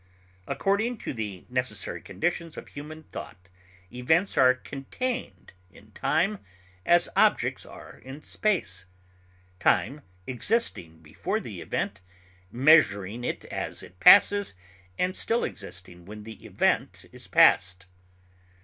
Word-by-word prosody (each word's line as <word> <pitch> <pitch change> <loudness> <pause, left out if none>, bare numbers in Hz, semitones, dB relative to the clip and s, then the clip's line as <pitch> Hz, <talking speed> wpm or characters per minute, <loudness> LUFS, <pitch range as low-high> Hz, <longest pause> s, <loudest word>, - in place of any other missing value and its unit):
According 220 +5 0
to - - -3
the 105 -6 -6
necessary 110 -9 -3
conditions 170 -1 -3
of - - -9
human 155 +2 -9
thought, 90 - -10 0.4
events 160 +10 +1
are 130 -1 +5
contained 235 - -5 0.2
in 105 +3 -19
time 180 - 0 0.5
as 175 0 +5
objects - - +2
are - - -13
in 135 +4 -11
space, 95 - -1 0.7
time 145 +3 +1 0.2
existing 120 - -2
before 75 - -3
the - - -8
event, 100 -1 -3 0.5
measuring 120 - +4
it - - -4
as - - -5
it 90 - -15
passes, 200 - +6 0.4
and 185 +1 0
still 230 +1 0
existing 90 -3 -8
when 105 +2 -10
the 110 +1 -11
event - - 0
is - - -9
past. 90 0 +4
130 Hz, 115 wpm, -27 LUFS, -, 0.7 s, passes